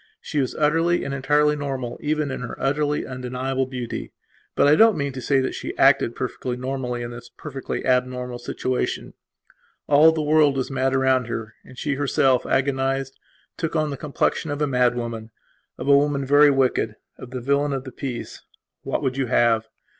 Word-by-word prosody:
She 150 - -3
was 130 -3 -1
utterly 165 +3 +2
and 140 - -4
entirely 150 +2 +2
normal 135 -4 -4
even 150 -1 -1
in 130 - -5
her 120 - -6
utterly 145 +2 0
undeniable 130 +1 -3
beauty. 125 -3 -5 0.4
But - - +4
I 145 - +6
don't 220 +3 +5
mean 140 -2 -2
to 130 - -6
say 135 +3 +2
that 130 - -2
she - - -6
acted - - +4
perfectly 125 -1 -4
normally 125 -1 -3
in 120 - -6
this 120 0 -10
perfectly 140 -3 -6
abnormal 125 -1 0
situation. 130 +1 -3 0.7
All 150 +3 +6
the 160 -1 -2
world 150 -2 +4
was 130 +1 -2
mad 135 0 0
around 130 -2 +2
her 115 -1 -5
and 130 - -15
she 145 - -1
herself, 135 -2 +2
agonized, 135 0 0 0.4
took 165 -1 -3
on 155 -2 +1
the - - -3
complexion 150 +3 -1
of 145 0 -3
a 150 - +2
mad 125 -3 +2
woman; 115 -2 -5 0.5
of - - -6
a 140 - +7
woman 140 -1 +2
very 145 +2 +6
wicked; 135 -2 +1 0.2
of 125 - -9
the 130 0 -5
villain 140 +3 +1
of 135 -2 -2
the 130 - -9
piece. 125 -1 -6 0.4
What - - -3
would 130 0 -1
you 135 -2 0
have? 115 -2 +2
135 Hz, 185 wpm, -23 LUFS, 125-145 Hz, 0.7 s, a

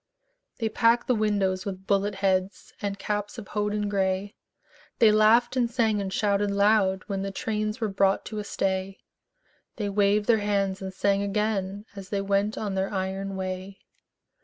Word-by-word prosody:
They 225 - -1
packed 230 +2 +3
the 255 - +2
windows 200 -4 0
with 190 -2 -6
bullet 200 0 +1
heads 190 0 -1
And 200 -1 -2
caps 205 +2 -3
of 215 -4 -9
hodden 210 0 -1
gray; 195 0 -1 0.6
They 225 -3 +6
laughed 220 +4 +4
and 245 -2 +2
sang 225 -4 +1
and 190 -1 -4
shouted 205 0 +1
loud 200 -2 +3
When 195 -2 -3
the 195 - -2
trains 215 +2 -2
were 225 - 0
brought 195 -1 +1
to 215 -1 -5
a - - -3
stay; 190 -1 -2 0.8
They 210 -3 -2
waved 205 +1 +2
their 225 -1 +4
hands 200 -2 0
and 190 0 -5
sang 200 +1 +1
again 200 -1 -1
As 195 -2 -9
they 200 - -1
went 200 +2 0
on 205 -2 -3
their 190 0 -1
iron 195 0 -3
way. 190 +1 -5
200 Hz, 170 wpm, -26 LUFS, 195-210 Hz, 0.8 s, They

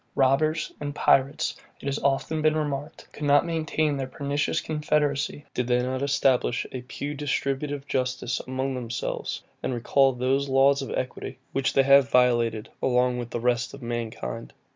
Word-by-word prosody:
Robbers 150 +4 +2
and 145 0 -4
pirates, 135 +1 +2 0.2
it - - -12
has 140 0 -1
often 140 +3 0
been 155 0 +3
remarked, 145 0 -4
could - - -12
not 145 +2 +5
maintain 155 -3 0
their 135 -1 -3
pernicious 140 +2 -1
confederacy, 150 -2 -1
did 125 - -1
they 125 0 +3
not 130 +1 -2
establish 135 -4 +2
a 130 - -5
pew 140 +3 -5
distributive 140 0 -2
justice 125 -2 -1
among 130 +1 -2
themselves, 120 -3 -4 0.2
and 130 - -2
recall 135 +3 +3
those 135 +3 0
laws 135 +1 +4
of 135 - -5
equity, 130 +1 -4
which 135 -1 0
they 135 - +5
have 140 0 +6
violated 120 -3 +2
with 125 -1 +1
the 120 - -3
rest 120 +2 0
of 140 - -12
mankind. 115 - -4
135 Hz, 160 wpm, -26 LUFS, 125-145 Hz, 0.2 s, have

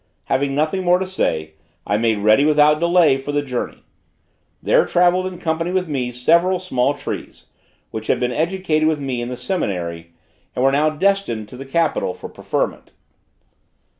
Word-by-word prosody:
Having 135 +1 0
nothing 155 +6 0
more 180 0 +4
to 190 - -2
say, 80 - -2 0.3
I 100 - 0
made 110 0 +1
ready, 110 +6 +5
without 150 0 +4
delay, 170 -5 +4
for 135 +2 -5
the 145 0 0
journey. 125 -3 -5 0.8
There - - +3
travelled 180 +1 +2
in 185 -1 -7
company 165 +1 -2
with 185 -1 0
me 130 -5 -2
several 170 +9 +2
small 145 -6 0
trees, - - -7 0.5
which 110 0 -6
had 120 - +1
been 125 0 0
educated 160 0 0
with 155 -2 +1
me 130 -4 -3
in 120 - -4
the 125 - -5
seminary, 85 - -3 0.4
and 125 - +1
were 135 - +5
now 150 +3 +3
destined 155 - 0
to - - -11
the 135 +2 -8
capital 155 - 0
for - - -9
preferment. - - -3
150 Hz, 170 wpm, -20 LUFS, 125-175 Hz, 0.8 s, ready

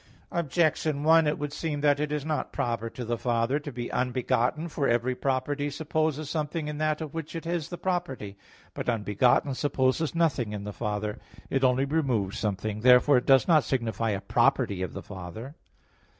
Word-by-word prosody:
Objection 155 -2 +1
1: 160 0 +5
It 150 - 0
would 145 0 -4
seem 150 -3 -3
that 145 -1 +3
it 150 0 -1
is 150 -1 -2
not 155 -3 -2
proper 115 -1 -2
to 120 +1 -7
the 120 0 -2
Father 120 +3 +1
to 145 -1 -7
be 120 -1 -5
unbegotten. 125 +4 0
For 145 -4 -1
every 120 +2 +1
property 140 +3 -1
supposes 155 0 -1
something 155 +1 -2
in 150 0 -4
that 155 0 0
of 155 -3 -6
which 165 0 -6
it 165 - -5
is 170 -2 -2
the 175 - -6
property. 170 - -3 0.4
But - - -3
"unbegotten" 120 +4 +2
supposes 140 +3 0
nothing 135 -10 +1
in 105 -1 -5
the 105 0 -6
Father; 105 0 -3 0.3
it 135 0 +1
only 130 +1 +3
removes 130 -10 0
something. 105 0 -2
Therefore 125 +3 +6
it 125 - -1
does 135 -1 +5
not 155 -5 +5
signify 115 -3 -1
a 100 -2 -1
property 100 -1 +1
of 95 - -3
the - - -7
Father. 100 - -8
135 Hz, 185 wpm, -27 LUFS, 115-155 Hz, 0.4 s, Therefore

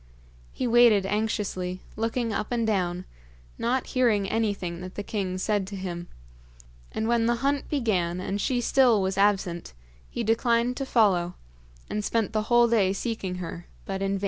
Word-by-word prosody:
He - - -3
waited 235 -4 +5
anxiously, 195 -3 -2
looking 225 +1 -1
up 210 - -2
and 235 -2 +1
down, 180 -4 -1 0.5
not 255 +3 0
hearing 225 -6 +2
anything 195 -6 -1
that 185 0 -8
the 205 - -4
king 190 -3 -3
said 205 0 0
to 200 - -6
him; 175 -2 -5 0.8
and 220 - -2
when 230 -1 +2
the 240 - +3
hunt 280 0 0
began 185 - 0
and 195 +2 -2
she 245 +2 0
still 245 -2 +4
was 190 0 -1
absent, 195 - +1 0.4
he - - -3
declined 235 +2 +2
to 275 - -3
follow, 185 -8 +2 0.5
and 210 - -3
spent 220 -1 0
the 215 - +1
whole 240 -1 +6
day 205 -5 +3
seeking 200 -4 -3
her, 175 -1 -7 0.2
but 195 0 -4
in 195 0 0
vain. - - -5
210 Hz, 170 wpm, -26 LUFS, 185-235 Hz, 0.8 s, whole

